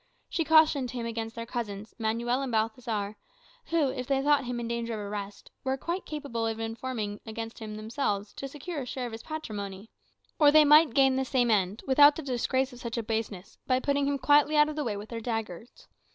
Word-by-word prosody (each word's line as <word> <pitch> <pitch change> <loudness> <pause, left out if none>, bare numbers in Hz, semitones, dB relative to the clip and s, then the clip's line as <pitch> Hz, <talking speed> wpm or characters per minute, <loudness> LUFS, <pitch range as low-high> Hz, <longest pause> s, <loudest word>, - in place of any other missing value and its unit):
She 330 - 0
cautioned 315 -5 +4
him 240 -2 -4
against 225 0 -4
their 230 0 -5
cousins, 215 -3 -5
Manuel 235 +3 0
and 270 -2 -3
Balthazar; 220 -2 -1 0.5
who, 320 - +1
if 255 -2 -5
they 275 -1 +2
thought 290 -2 +3
him 245 0 -3
in 235 - -4
danger 235 -1 -2
of - - -5
arrest, 205 -1 -7
were 265 0 0
quite 345 +7 -4
capable 280 -7 -3
of 225 0 -3
informing 225 -2 -4
against 225 0 -6
him 215 -1 -6
themselves, 215 -2 -2
to 275 - -6
secure 295 +3 -6
a - - -5
share 255 0 -4
of 240 - -5
his 225 0 -7
patrimony. 210 -9 -6 0.5
Or 295 -2 +7
they 305 0 +7
might 300 -3 +6
gain 270 -1 +4
the 265 - +1
same 245 -2 +1
end, 200 0 +1
without 290 +2 +7
the 320 - -6
disgrace 260 0 0
of 245 - -11
such 235 -1 -5
a 230 - -1
baseness, 220 -4 -4
by 255 -1 +3
putting 280 +1 +1
him 285 0 +1
quietly 290 +3 +4
out 300 0 +6
of 305 - -5
the 300 - -1
way 215 -5 -2
with 210 +2 -8
their 230 -1 -5
daggers. 225 -2 -5
240 Hz, 215 wpm, -28 LUFS, 220-280 Hz, 0.5 s, Or